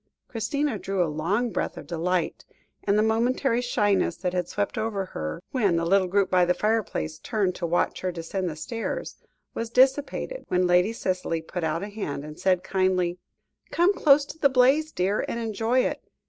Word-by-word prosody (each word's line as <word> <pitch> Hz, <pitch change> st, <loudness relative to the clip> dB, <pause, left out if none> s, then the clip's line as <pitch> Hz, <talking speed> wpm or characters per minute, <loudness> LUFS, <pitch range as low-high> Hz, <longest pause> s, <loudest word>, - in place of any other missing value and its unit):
Christina 240 Hz, +1 st, -2 dB
drew 195 Hz, -1 st, 0 dB
a 155 Hz, -3 st, -2 dB
long 200 Hz, +10 st, 0 dB
breath -, -, -2 dB
of -, -, -8 dB
delight, 175 Hz, 0 st, -1 dB, 0.4 s
and 200 Hz, 0 st, +3 dB
the 215 Hz, -, +4 dB
momentary 235 Hz, +2 st, +1 dB
shyness 205 Hz, -7 st, +1 dB
that 180 Hz, -1 st, -2 dB
had 180 Hz, -2 st, -1 dB
swept 205 Hz, 0 st, -2 dB
over 210 Hz, -3 st, -2 dB
her, 75 Hz, -, -5 dB
when 205 Hz, -9 st, +2 dB
the 165 Hz, 0 st, 0 dB
little 190 Hz, +1 st, +3 dB
group 195 Hz, +1 st, +1 dB
by 180 Hz, -1 st, +5 dB
the 180 Hz, 0 st, +2 dB
fireplace 210 Hz, -7 st, -1 dB
turned 200 Hz, -5 st, 0 dB
to 175 Hz, -1 st, -3 dB
watch 175 Hz, +1 st, 0 dB
her 185 Hz, -, -1 dB
descend 175 Hz, +2 st, -3 dB
the 155 Hz, -, -6 dB
stairs, 225 Hz, +9 st, -4 dB, 0.4 s
was 230 Hz, 0 st, -4 dB
dissipated 270 Hz, -, +2 dB
when 180 Hz, 0 st, +2 dB
Lady 180 Hz, +4 st, +4 dB
Cicely 185 Hz, -6 st, -2 dB
put 180 Hz, +1 st, -5 dB
out 160 Hz, +3 st, -1 dB
a 205 Hz, -, -5 dB
hand, 175 Hz, -9 st, -5 dB
and 150 Hz, 0 st, -10 dB
said 185 Hz, -1 st, +2 dB
kindly: 185 Hz, -2 st, 0 dB, 0.5 s
"Come 350 Hz, +4 st, +3 dB
close 285 Hz, -6 st, +5 dB
to 310 Hz, -, -10 dB
the 280 Hz, -, +5 dB
blaze, 270 Hz, +5 st, +3 dB
dear, 195 Hz, -1 st, 0 dB
and -, -, -2 dB
enjoy 225 Hz, +3 st, +1 dB
it. -, -, -2 dB
195 Hz, 190 wpm, -26 LUFS, 180-230 Hz, 0.5 s, by